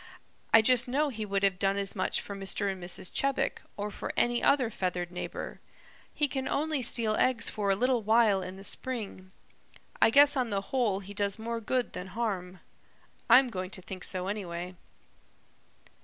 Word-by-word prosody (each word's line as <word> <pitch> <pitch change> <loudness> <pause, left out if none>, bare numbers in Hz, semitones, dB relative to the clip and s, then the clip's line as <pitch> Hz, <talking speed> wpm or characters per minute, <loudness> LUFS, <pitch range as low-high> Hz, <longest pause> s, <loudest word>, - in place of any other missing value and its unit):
I 225 - +7
just 250 +1 +4
know 290 +4 +1
he 220 -5 -5
would 195 0 -1
have 190 -2 +2
done 195 0 +1
as 200 -1 -2
much 185 - 0
for 200 - -7
Mr. 195 +1 -1
and 185 -2 -8
Mrs. 180 +1 -2
Chebec, 275 0 0 0.2
or 205 +1 -4
for - - -5
any 240 0 +2
other 260 -5 +2
feathered 180 -3 -3
neighbor. 180 - -6 0.5
He 295 - 0
can 265 -1 -3
only 305 -1 -1
steal 230 -2 +4
eggs 245 -3 +4
for 205 -2 -2
a 195 - +3
little 250 +3 +1
while 215 -2 +3
in 185 0 -7
the 195 - -11
spring. 205 -6 -3 0.7
I - - +7
guess 285 +4 +6
on 255 -3 0
the 200 -2 -1
whole 220 -7 +1
he 200 +1 -10
does 200 0 0
more 230 +1 -4
good 245 +2 -1
than 180 - -6
harm. 190 -6 -3 0.7
I'm 250 +2 +7
going 185 -4 -5
to 185 - -8
think 185 0 -8
so 185 -1 0
anyway." 180 -3 -5
210 Hz, 185 wpm, -29 LUFS, 190-245 Hz, 0.7 s, I